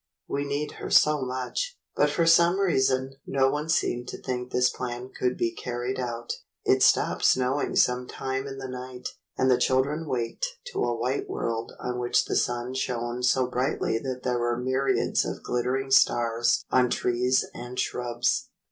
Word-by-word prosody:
"We 140 +1 -2
need 145 +1 -2
her - - -4
so 150 -1 +5
much." 130 - -3 0.2
But - - +3
for 170 - +1
some 170 +3 +5
reason 130 -7 +2
no 135 -1 +2
one 150 +2 -3
seemed 120 -6 0
to - - -6
think 125 -1 -4
this 125 0 +3
plan 125 0 -4
could 125 0 0
be 115 - 0
carried 125 +1 -4
out. 120 -1 -3 0.3
It - - +3
stopped - - +3
snowing 130 +3 +2
some 125 0 +2
time 135 +1 -3
in 135 0 -7
the 135 0 -6
night, 125 0 -6 0.3
and 130 0 +3
the 125 - +4
children 140 +5 +1
waked 125 - -2 0.3
to - - 0
a 120 -1 0
white 125 +4 -2
world 115 0 -3
on 125 0 -3
which 120 0 +2
the - - -2
sun 120 +1 0
shone 120 -1 -2
so 125 +1 +3
brightly 125 -2 -1
that 130 0 -5
there 125 -1 0
were 120 0 0
myriads 130 +2 +1
of - - -5
glitter 125 +2 0
ing 135 0 -5
stars 120 -3 +3
on 125 -1 +4
trees 125 +2 +1
and 125 +1 -7
shrubs. 120 -1 -1
125 Hz, 175 wpm, -26 LUFS, 120-135 Hz, 0.3 s, so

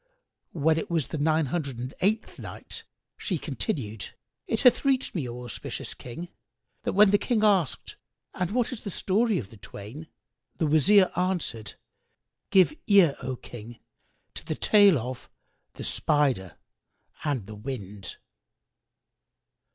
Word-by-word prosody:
When 160 0 +2
it - - -5
was 165 -5 0
the 155 - -3
Nine 155 +1 +3
Hundred 140 -3 -3
and 125 +2 -5
Eighth 215 +4 0
Night, - - -7 0.3
She 185 - -1
continued, 110 -6 -4 0.3
It 225 - 0
hath 250 -2 +6
reached 270 -2 +1
me, 145 -9 -2
O 120 +1 -7
auspicious 120 - -5
King, 165 +9 -8 0.5
that - - -2
when 200 0 +6
the 205 - +5
King 230 -4 +1
asked, 190 -9 +2 0.4
"And 180 -1 -1
what 240 +2 0
is 250 - -6
the 205 - -5
story 205 +3 +1
of 105 - -5
the 110 - -13
twain?", 110 +11 -9 0.5
the 160 - +1
Wazir 185 +6 +5
answered, 170 - -1 0.7
"Give 190 - +5
ear, 195 -8 +6
O 130 0 -3
King, 120 -1 -10 0.6
to - - -6
the 155 -1 -3
tale 205 -3 +6
of 125 +1 -6 0.5
The - - -7
Spider 135 - +1 0.7
and 140 -9 -1
the 110 - -9
Wind. 105 -4 -7
155 Hz, 145 wpm, -27 LUFS, 125-195 Hz, 0.7 s, hath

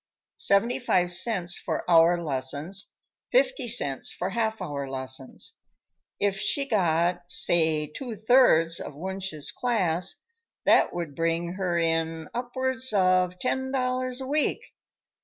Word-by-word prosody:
Seventy 230 +6 +2
five 180 -8 +1
cents 175 -2 0
for - - -4
hour 170 0 +5
lessons, 145 +5 -3 0.4
fifty - - +2
cents 145 - 0
for 180 +2 -4
half 220 0 -1
hour 140 -2 -5
lessons. 130 0 -2 0.6
If 200 -1 0
she 275 +6 0
got, 175 -5 +1
say 160 -4 +3
two 225 - -7
thirds 205 -7 +4
of 145 - -7
Wunsch's 190 -2 -2
class, 185 -7 0 0.5
that - - +4
would 170 -4 -5
bring 165 +2 -1
her 185 -2 -1
in 165 -1 -1
upwards 260 +1 -2
of 185 -2 +2
ten 265 +5 -2
dollars 255 -1 -1
a - - -4
week. 295 +3 -1
180 Hz, 125 wpm, -26 LUFS, 165-240 Hz, 0.6 s, hour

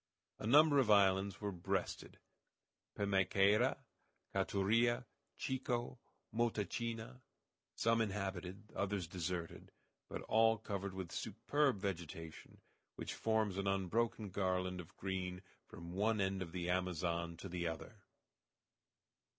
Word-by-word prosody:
A - - -3
number 145 +3 +7
of 125 -5 +3
islands 100 -1 +4
were 105 -1 -2
breasted 95 0 -3 0.8
Pimaicaira, 100 +4 +3 0.6
Caturia, 115 +5 +2 0.3
Chico, 125 -1 -2 0.3
Motachina; 115 +2 -1 0.5
some 115 0 +3
inhabited, 100 -1 -3
others 100 -2 -1
deserted, 85 -1 -4 0.4
but - - -5
all 110 0 +4
covered 100 -2 -4
with 95 -3 -5
superb 145 -5 +1
vegetation, 85 -4 -5 0.4
which - - -4
forms 110 -3 +1
an 100 - -1
unbroken 100 +2 0
garland 90 -1 0
of 85 - -16
green 90 -1 -3 0.2
from 85 -6 -9
one 105 +3 +2
end 95 0 0
of 85 -3 -4
the 90 -1 -3
Amazon 85 -2 -1
to 95 - -7
the 85 -1 -2
other. 80 -2 -6
100 Hz, 110 wpm, -37 LUFS, 90-110 Hz, 0.8 s, number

